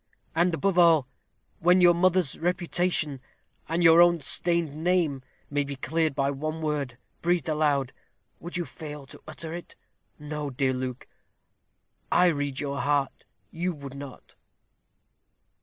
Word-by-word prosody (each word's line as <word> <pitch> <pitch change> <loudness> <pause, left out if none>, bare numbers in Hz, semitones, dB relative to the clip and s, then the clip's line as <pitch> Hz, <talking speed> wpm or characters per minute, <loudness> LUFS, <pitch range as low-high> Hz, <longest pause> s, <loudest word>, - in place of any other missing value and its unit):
And, 170 +1 +2
above 190 +1 +1
all, 165 -6 +5 0.5
when 180 +2 +5
your 175 -1 +7
mother's 180 -3 +2
reputation, 175 -4 -1 0.5
and 170 +2 0
your 165 0 +8
own 175 -1 +5
stained 170 +1 0
name, 160 -4 +1 0.3
may 145 0 +1
be 140 0 -6
cleared 160 +2 -1
by 140 0 +1
one 155 +3 -4
word, 145 -6 -2 0.2
breathed 175 -4 +1
aloud, 145 -4 +1 0.5
would 175 +1 -5
you 175 - -2
fail 150 -4 -9
to - - -13
utter 160 +1 -7
it? 175 0 -8 0.4
No, 150 -1 -5
dear 130 0 0
Luke, 130 -1 -5 1.0
I 180 - +5
read 145 -4 -2
your 140 -1 -3
heart; 140 -1 0 0.3
you 175 +1 -2
would 140 -2 -9
not." 140 -1 -10
155 Hz, 140 wpm, -27 LUFS, 140-175 Hz, 1.0 s, your